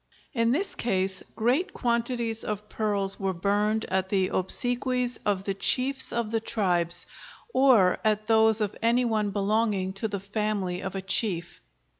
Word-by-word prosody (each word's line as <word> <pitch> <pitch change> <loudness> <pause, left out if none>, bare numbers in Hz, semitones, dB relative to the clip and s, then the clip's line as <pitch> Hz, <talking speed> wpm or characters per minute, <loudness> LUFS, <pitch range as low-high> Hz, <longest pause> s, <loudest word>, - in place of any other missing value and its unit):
In 230 -2 +2
this 375 +9 0
case 190 -4 -1
great 255 - 0
quantities 235 -1 -1
of 210 0 -4
pearls 200 -3 -1
were 190 -2 -1
burned 205 +4 0
at 190 0 -1
the 190 -2 +1
obsequies 245 +5 -1
of 195 -2 +1
the 195 - -1
chiefs 260 +7 0
of 235 -2 -2
the 225 - +1
tribes, 175 -6 0 0.5
or 240 -9 +5
at 215 0 +1
those 220 0 +4
of 205 -2 -1
any 235 +2 +3
one 215 -3 0
belonging 200 -1 0
to 195 +3 -3
the 200 -2 -4
family 200 -2 -2
of 190 0 -5
a 190 - -4
chief. 185 -4 -1
215 Hz, 155 wpm, -27 LUFS, 195-230 Hz, 0.5 s, or